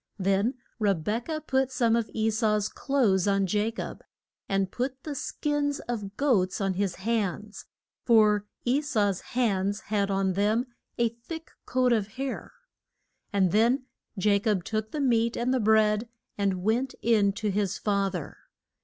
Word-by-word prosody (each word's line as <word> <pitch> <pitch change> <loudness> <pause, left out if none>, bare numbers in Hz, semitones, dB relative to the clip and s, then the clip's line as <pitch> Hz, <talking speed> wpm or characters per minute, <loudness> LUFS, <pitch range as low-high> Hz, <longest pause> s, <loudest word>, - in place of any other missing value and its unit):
Then 195 +5 +1 0.2
Re 205 -3 +3
bek 210 +9 -3
ah 310 -1 -1
put 265 -2 +1
some 235 -3 +2
of 230 -3 0
E 220 0 +1
sau's 215 -2 +1
clothes 220 -10 +1
on 195 -1 +2
Ja 210 +4 +1
cob, 230 - -6 0.5
and 195 -2 0
put 260 +1 -3
the 300 - -4
skins 285 +1 -1
of 210 -4 -5
goats 210 -10 +2
on 195 -2 0
his 190 -1 -1
hands, 210 0 -2 0.4
for 210 -3 +4 0.2
E 255 +4 +2
sau's 210 - 0 0.2
hands 205 -4 +1
had 200 -2 -1
on 195 -1 +1
them 210 +5 +1 0.3
a 235 -1 +2
thick 280 +9 -9 0.2
coat 255 -1 +3
of 215 -4 +1
hair. 270 0 -4 0.8
And 190 -3 +2
then 235 +6 +3 0.3
Ja 200 +1 +3
cob 200 -3 0
took 215 +1 -2
the 300 - -3
meat 235 -3 +2
and 245 +2 +1
the 260 - +2
bread 215 0 +3 0.3
and 195 -3 -1
went 240 +5 0
in 215 -3 +4
to 210 0 -2
his 195 -1 0
fa 200 -2 +1
ther. - - -6
215 Hz, 160 wpm, -27 LUFS, 200-240 Hz, 0.8 s, for